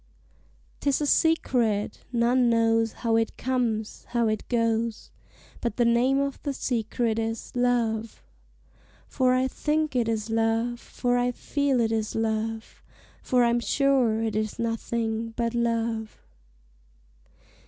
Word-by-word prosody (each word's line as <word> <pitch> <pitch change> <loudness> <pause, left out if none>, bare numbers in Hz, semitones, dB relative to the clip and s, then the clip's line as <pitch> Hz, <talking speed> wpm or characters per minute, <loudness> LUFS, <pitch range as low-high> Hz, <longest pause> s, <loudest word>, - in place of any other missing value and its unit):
'Tis 280 -1 +1
a - - +1
secret: 245 -11 +1
none 240 +1 +3
knows 225 -1 +2
how 225 -1 +3
it 225 0 0
comes, 235 -4 -2
how 235 -1 +1
it 215 -1 -2
goes 230 -1 0 0.5
But 235 -3 -2
the 240 - +3
name 245 +4 +3
of 280 -1 -2
the 285 - -2
secret 230 -2 -1
is 225 0 -3
Love! 230 -3 0 0.8
For 255 -2 +2
I 255 +1 +2
think 305 +1 -1
it 235 -2 +1
is 220 0 -2
Love, 225 +1 0
For 245 0 -1
I 245 0 +1
feel 280 +1 0
it 225 -1 +1
is 220 -1 -2
Love, 225 0 -2 0.4
For 250 -1 +2
I'm 235 0 +3
sure 250 -3 +2
it 220 -2 -2
is 215 -1 -2
nothing 230 0 -2
but 235 -1 0
Love! 230 -2 -2
230 Hz, 130 wpm, -26 LUFS, 225-245 Hz, 0.8 s, none